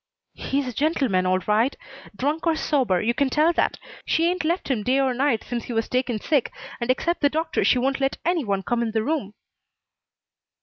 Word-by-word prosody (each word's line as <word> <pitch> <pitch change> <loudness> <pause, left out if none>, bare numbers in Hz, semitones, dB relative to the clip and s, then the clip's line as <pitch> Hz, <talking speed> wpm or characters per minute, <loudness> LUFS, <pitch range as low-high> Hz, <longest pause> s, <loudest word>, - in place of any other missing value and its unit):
"He's 275 0 -2
a 250 - -4
gentleman, 265 - +1
all 185 0 +3
right. 220 +5 +2 0.4
Drunk 295 +8 -1
or 325 - +3
sober, 255 - +1
you 235 +2 +1
can 275 +2 +1
tell 310 +5 +3
that. - - 0 0.3
She 330 0 +1
ain't 360 -1 -3
left 340 +2 -1
him 235 -5 0
day 255 +6 +1
or 265 -2 +2
night 250 -3 +1
since 240 -2 -3
he 245 - -5
was 225 0 0
taken 250 -3 -1
sick, 285 +2 0 0.3
and 235 0 -3
except 340 +7 0
the 285 - +4
doctor 320 +3 -1
she - - +4
won't 270 +2 0
let 270 0 0
any 345 -2 +1
one 200 -3 -1
come 240 +2 -1
in 225 -2 -2
the 220 -1 +1
room." 245 -7 -2
260 Hz, 210 wpm, -24 LUFS, 230-305 Hz, 0.4 s, the